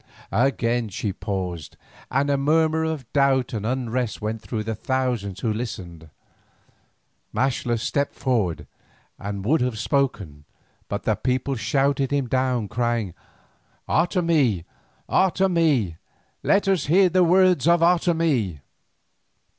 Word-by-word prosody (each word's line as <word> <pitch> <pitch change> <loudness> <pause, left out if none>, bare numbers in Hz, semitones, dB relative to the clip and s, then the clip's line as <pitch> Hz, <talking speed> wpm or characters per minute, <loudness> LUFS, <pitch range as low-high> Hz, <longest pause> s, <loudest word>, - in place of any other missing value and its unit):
Again 120 0 +1
she 100 +1 -3
paused, 90 -6 -5 0.3
and 140 +2 +1
a - - +3
murmur 160 +3 +2
of 160 -5 -3
doubt 135 -3 +2
and 110 -1 -3
unrest 125 -2 -2
went 110 +1 -4
through 110 -2 -4
the 110 +1 -3
thousands 115 -5 -2
who 110 -3 0
listened. 95 -9 -6 1.3
Maxtla 120 -1 0
stepped 140 +5 -1
forward 110 - -1 0.5
and 100 -1 -5
would 150 +6 +2
have 125 -3 -1
spoken, 105 - -1 0.4
but - - -3
the - - +2
people 130 +2 -1
shouted 135 +2 +1
him 140 -3 0
down, 130 -3 0
crying: 120 -4 -1 0.7
"Otomie, 165 - +1 0.4
Otomie! 165 - +2 0.4
Let 200 0 +2
us 190 -7 +1
hear 185 +5 +5
the 180 +1 +3
words 180 -3 +4
of 170 0 +4
Otomie." 165 - +1
130 Hz, 120 wpm, -23 LUFS, 110-155 Hz, 1.3 s, hear